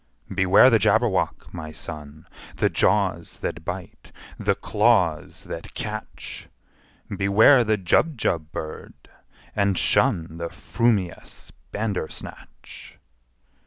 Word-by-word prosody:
"Beware 95 +7 +6
the 115 - +5
Jabberwock, - - +1
my 80 -1 -7
son! 75 -1 -9 0.3
The - - +1
jaws 95 -3 +1
that 85 - -4
bite, 90 +1 -7 0.3
the - - +1
claws 100 -8 +1
that - - -8
catch! - - -6 0.7
Beware 110 +7 +5
the 110 -1 +1
Jubjub 90 - 0
bird, 80 -1 -7 0.6
and 100 -3 +1
shun 85 -10 +1
The 85 0 -3
frumious 105 -6 -2 0.2
Bandersnatch!" 105 -7 -6
95 Hz, 95 wpm, -24 LUFS, 85-110 Hz, 0.7 s, Beware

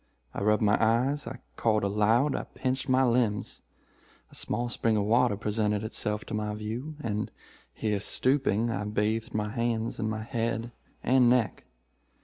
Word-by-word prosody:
I - - -4
rubbed 105 +2 +3
my 105 +2 +3
eyes. 125 +5 +2
I 125 +2 -5 0.2
called 110 -2 +1
aloud. 110 +8 +2
I - - -3
pinched 130 +1 -1
my 130 +1 +4
limbs. 115 -5 0 0.7
A - - -18
small 120 +1 -1
spring 115 -2 0
of 105 - +1
water 115 0 +3
presented 105 0 0
itself 105 -1 -3
to - - -7
my 105 0 -2
view, 115 +8 -5
and 105 -4 -2 0.4
here, 105 - -1
stooping, 120 0 +2
I 105 -2 -2
bathed 105 +2 -1
my 105 -1 0
hands 115 0 -1
and 110 -1 0
my 110 0 -3
head 115 0 -2 0.3
and 125 0 +5
neck. 120 -3 +1
110 Hz, 160 wpm, -28 LUFS, 105-120 Hz, 0.7 s, and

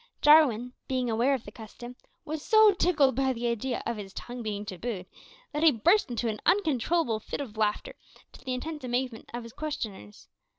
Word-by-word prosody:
Jarwin, 255 -6 +5
being 255 -2 -1
aware 240 +5 +2
of 245 - -6
the 205 - -9
custom, 240 +2 -10 0.3
was 310 0 -4
so 435 -1 +6
tickled 320 -7 +3
by 265 0 +1
the 240 0 -5
idea 235 +2 -2
of 235 - -2
his 195 -2 -8
tongue 245 0 -7
being 210 -2 -4
tabooed, 195 0 -5 0.5
that 300 -1 -2
he 325 - +7
burst 335 - +3
into 240 0 -2
an 215 -1 -3
uncontrollable 320 - +1
fit - - -6
of 250 -7 -6
laughter, 215 -1 -1 0.4
to - - -16
the 255 -1 -2
intense 300 +2 -6
amazement 250 -2 -3
of 240 0 -5
his 230 -1 -11
questioners. 220 - -6
245 Hz, 185 wpm, -28 LUFS, 220-295 Hz, 0.5 s, he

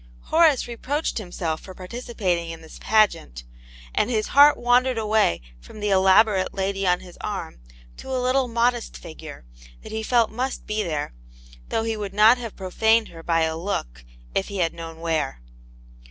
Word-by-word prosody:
Horace 315 -6 +4
reproached 265 +5 -2
himself 175 -5 -4
for 185 - -11
participating 185 -4 -3
in 165 0 -8
this 160 - -13
pageant, 205 - +1 0.5
and - - +1
his 220 -3 -1
heart 290 +1 +7
wandered 245 +1 +2
away 215 - +2 0.2
from 215 - -13
the 205 -1 -1
elaborate 190 +1 +4
lady 195 0 -1
on 180 0 +2
his 180 -2 -14
arm 200 - -5 0.4
to - - -10
a 260 - -1
little 255 +1 +1
modest 235 0 0
figure, 155 - -11 0.4
that - - -10
he 220 - -3
felt 230 0 +2
must 255 +4 -3
be' 215 0 -1
there, 155 - -3 0.6
though 225 - 0
he 225 0 -1
would 200 -2 -6
not 220 +4 +6
have 230 -3 -7
pro 185 -2 -7
faned 220 +2 +3
her 165 -1 -11
by 165 0 +1
a 160 0 0
look, - - -4 0.3
if - - 0
he 200 - -6
had 170 -3 +1
known 165 -1 -9
where. 155 - -1
205 Hz, 175 wpm, -23 LUFS, 170-235 Hz, 0.6 s, heart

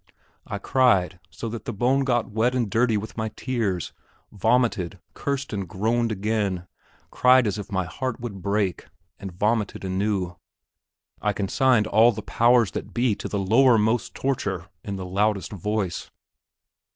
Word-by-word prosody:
I 100 - -3
cried, 100 - +2
so 115 - -6
that 115 0 -7
the - - -3
bone 125 +6 +2
got 120 -3 0
wet 115 +4 +1
and 120 -5 0
dirty 115 -1 +2
with 110 +2 -6
my 110 0 -1
tears, 110 -9 -2 0.4
vomited, 110 -4 +1 0.2
cursed 140 -2 -3
and 100 -4 -3
groaned 115 +5 0
again, 100 -3 -1 0.5
cried 130 0 +5
as 105 0 -1
if 100 - -8
my 95 -2 0
heart 130 +8 -4
would 110 -6 -6
break, 100 -2 -1 0.3
and 95 - -6
vomited 105 +2 -1
anew. 95 -1 -1 0.8
I 105 - +1
consigned 110 +3 +2
all 110 +3 +5
the 110 -2 -7
powers 120 -1 +3
that - - -6
be 120 -2 +2
to - - -5
the 105 - -3
lowermost 110 +2 +3
torture 100 -9 -2
in 100 - -4
the 95 -1 -5
loudest 100 +1 0
voice. 100 -2 -3
105 Hz, 150 wpm, -24 LUFS, 95-120 Hz, 0.8 s, cried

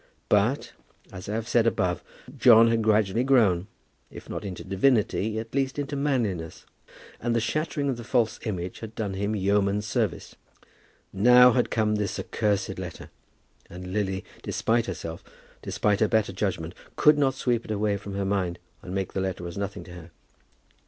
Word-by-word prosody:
But, - - +2 0.4
as 95 +2 -8
I 105 - -2
have 115 0 -3
said 120 -2 +3
above, 90 -6 0 0.3
John 115 -2 +7
had 115 0 +2
gradually 110 +1 +2
grown, 105 -9 +3 0.4
if - - -11
not - - -5
into 95 -3 -6
divinity, 110 +1 +1
at 115 +1 -6
least 135 0 -1
into 145 0 -3
manliness; 115 - -2 0.5
and 120 0 -1
the - - +3
shattering 145 +5 -1
of 130 -3 -1
the 120 - -7
false 115 -1 +1
image 90 -5 -4
had 110 -1 -9
done 105 -3 -3
him 100 +3 -1
yeoman's 100 +1 +1
service. 100 - -2 0.8
Now 125 +5 +7
had 125 0 +1
come 105 -1 +1
this 105 -3 -2
accursed 105 -3 -1
letter, - - -8 0.6
and 90 +1 -8
Lily, 95 -2 -1 0.2
despite 115 +1 0
herself, 80 +1 -6 0.4
despite 105 -1 0
her 110 - +3
better 105 -3 +1
judgment, 90 -4 -2 0.2
could 150 0 +5
not 135 -2 +2
sweep 120 -3 0
it - - -14
away 105 -1 0
from 100 0 -7
her 100 0 -1
mind 95 -3 -1 0.2
and 90 - -7
make 95 -1 -2
the 95 - -1
letter 90 -2 -3
as 85 - -7
nothing 100 0 -4
to 90 - -13
her. 85 -1 -11
105 Hz, 170 wpm, -26 LUFS, 95-115 Hz, 0.8 s, John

